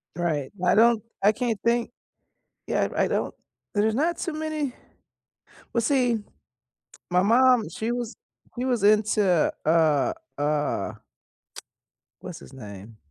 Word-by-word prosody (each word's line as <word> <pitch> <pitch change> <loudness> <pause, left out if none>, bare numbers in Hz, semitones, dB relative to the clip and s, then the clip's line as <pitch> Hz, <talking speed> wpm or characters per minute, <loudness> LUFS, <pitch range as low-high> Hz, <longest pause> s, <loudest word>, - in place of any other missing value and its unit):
Right, 155 -6 -1
I - - +4
don't 230 0 +5 0.2
I 210 - +6
can't 225 -2 -2
think 235 0 +1 0.8
yeah, - - +1
r - - -7
I - - +3
don't - - -1 0.4
there's 215 +1 +2
not 330 +5 +1
too 340 - -3
many 310 -4 -3 1.0
well, 235 - +2
see, 245 -4 +1 0.9
my 180 +1 +3
mom, 240 0 +4
she 220 +7 -3
was 240 -1 -3 0.4
she 250 - -1
was 245 -5 0
into, 210 -4 +3
uh 155 -3 +3 0.2
uh 150 0 -1 1.3
What's - - -8
his - - -14
name? 105 -3 -10
215 Hz, 130 wpm, -25 LUFS, 165-245 Hz, 1.3 s, I